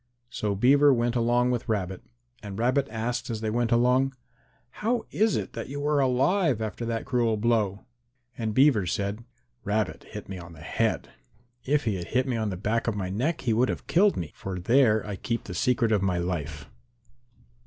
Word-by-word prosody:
So 105 -4 -2
Beaver 140 +7 +5
went 120 -1 +1
along 120 +1 +2
with 120 -1 -3
Rabbit. 95 -4 -2 0.4
And 100 -2 -7
Rabbit 130 +4 +1
asked 115 +3 -3
as 110 -2 -3
they 110 -1 -1
went 120 0 0
along, 125 +3 +3 0.7
"How 230 +2 0
is 220 0 +2
it - - -4
that - - -6
you 145 +1 -4
are 150 -1 +2
alive 135 - +2
after 110 +2 -4
that 115 -1 -2
cruel 120 -4 +1
blow?" 105 -3 0 0.5
And 110 -2 -3
Beaver 130 -9 +4
said, 100 +5 -2 0.4
"Rabbit 105 -1 -1
hit - - -9
me 95 -2 -6
on 85 -1 -11
the 80 - -13
head. - - -1 0.6
If 145 +2 +2
he 110 -5 -1
had 85 - -6
hit 130 0 +1
me 125 - -1
on 110 -2 -1
the 95 - -4
back 110 +5 -1
of 115 - 0
my 95 -2 -3
neck 135 - -1
he 115 - +1
would 125 +3 +2
have - - -4
killed 200 +4 +3
me, 80 -4 -4
for 95 -1 -6
there 110 +2 +3
I 105 -2 -5
keep 115 +5 -3
the 90 - -7
secret 120 +1 +1
of 105 -3 +3
my 95 -2 +1
life." 75 -5 -3
115 Hz, 195 wpm, -27 LUFS, 100-130 Hz, 0.7 s, Beaver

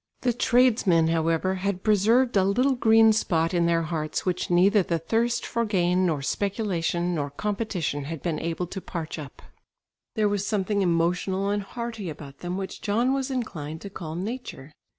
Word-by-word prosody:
The 245 -1 +1
tradesmen, 225 -9 +3
however, 165 +3 +1
had 195 -1 -2
preserved 225 +4 +3
a 195 - +4
little 250 +8 +2
green 225 -2 +5
spot 165 -5 0
in 170 -1 +2
their 165 0 +2
hearts 155 -2 -3
which 180 -1 -1
neither 195 +4 +4
the 170 -2 -1
thirst 230 +8 0
for 235 - -1
gain 185 -3 +2
nor 150 -5 -1
speculation 180 -2 -1
nor 145 -4 -2
competition 180 -4 -3
had 160 0 -6
been 165 -4 -1
able 165 +2 -2
to 190 +2 -7
parch 165 -3 -5
up. 140 -3 -10 0.7
There 215 -1 +2
was 205 -1 0
something 205 -1 0
emotional 180 +3 +1
and 205 0 0
hearty 225 -2 -6
about 140 -2 -10
them 175 +1 -4
which 195 -1 -6
John 235 +6 +1
was 270 0 -1
inclined 160 - -4
to 200 - -8
call 160 -4 -6
"nature." 190 - -6
185 Hz, 170 wpm, -25 LUFS, 165-220 Hz, 0.7 s, green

